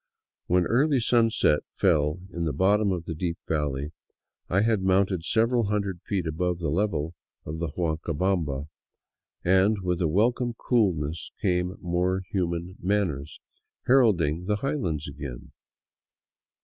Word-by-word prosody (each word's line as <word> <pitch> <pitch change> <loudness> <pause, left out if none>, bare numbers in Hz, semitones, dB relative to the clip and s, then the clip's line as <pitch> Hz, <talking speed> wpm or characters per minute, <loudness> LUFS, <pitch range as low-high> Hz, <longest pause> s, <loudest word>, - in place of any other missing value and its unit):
When 90 0 +3
early 140 - +3
sunset 115 -9 +3
fell 80 -2 +1
in 85 -1 -2
the 75 - -1
bottom 100 +6 +3
of 85 -3 -3
the 80 - -4
deep 85 +1 -3
valley, 75 -2 -1 0.6
I 95 +3 +3
had 110 -2 +2
mounted 95 -2 +2
several 115 +4 +2
hundred 100 -3 -2
feet 95 -4 -2
above 90 +2 -1
the 80 -4 -2
level 85 -3 0 0.3
of 80 +2 -5
the 85 - -1
Huancabamba, 80 -3 -1 0.8
and 95 +4 +4
with 90 -1 -1
a 85 - +3
welcome 120 +8 +1
coolness 85 - 0
came 90 -1 0
more 90 +2 0
human 85 -1 -2
manners, 90 -7 -1 0.5
heralding 90 - +3
the 105 +2 +1
highlands 100 - -2
again. 70 -4 -8
90 Hz, 130 wpm, -26 LUFS, 80-100 Hz, 0.8 s, and